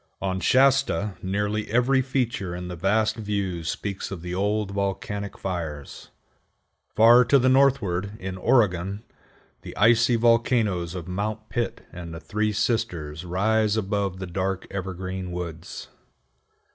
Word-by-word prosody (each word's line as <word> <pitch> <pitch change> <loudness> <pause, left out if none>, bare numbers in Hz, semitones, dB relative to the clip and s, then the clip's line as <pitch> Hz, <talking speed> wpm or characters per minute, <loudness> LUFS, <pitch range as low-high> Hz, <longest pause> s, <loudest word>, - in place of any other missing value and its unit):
On 95 -1 -2
Shasta 130 -5 +3
nearly 105 +3 -2
every 125 +4 +3
feature 120 -8 -2
in 90 0 -6
the 90 - -5
vast 110 +6 +1
view 100 -5 -2
speaks 95 +5 -4
of 90 -4 -7
the 90 0 -5
old 105 +2 0
volcanic 100 +1 -3
fires. 80 -6 -5 0.9
Far 120 +3 +7
to 140 - +5
the 130 0 +3
northward, 120 -8 +2
in 95 0 -5
Oregon, 100 -1 +1 0.6
the - - -10
icy 115 +3 +4
volcanoes 115 -7 +2
of 90 -2 -6
Mount 105 +4 -4
Pitt 120 -1 -2
and 85 -2 -7
the - - -6
Three 105 +4 -1
Sisters 90 -8 -2
rise 105 +4 +1
above 100 -2 -1
the 95 - -5
dark 95 +1 -2
evergreen 95 -1 -5
woods. 85 -2 -7
100 Hz, 135 wpm, -25 LUFS, 90-110 Hz, 0.9 s, Far